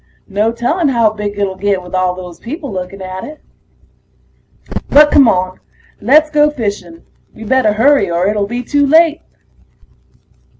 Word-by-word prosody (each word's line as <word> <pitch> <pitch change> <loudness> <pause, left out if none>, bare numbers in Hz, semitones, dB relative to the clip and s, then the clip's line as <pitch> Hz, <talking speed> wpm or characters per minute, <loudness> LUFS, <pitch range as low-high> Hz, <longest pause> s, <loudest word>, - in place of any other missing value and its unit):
No 210 +2 0
telling 285 +9 -1
how 235 -5 +2
big 210 -1 -5
it'll 200 -2 -1
get 195 -1 -1
with 180 - -13
all 185 -1 0
those 180 -2 -10
people 285 +3 -7
looking 185 +1 -6
at 185 0 -7
it. 300 0 -10 1.5
But 295 +1 +6
come 275 -4 +6
on, 185 -2 0 0.4
let's 305 +7 +3
go 300 0 +3
fishing. 205 - -6 0.3
We'd 220 -1 -9
better 260 -5 +2
hurry 275 +4 +3
or 170 +1 0
it'll 205 -1 -1
be 240 +3 -4
too 285 +3 +1
late. 320 +2 +3
215 Hz, 155 wpm, -14 LUFS, 190-285 Hz, 1.5 s, But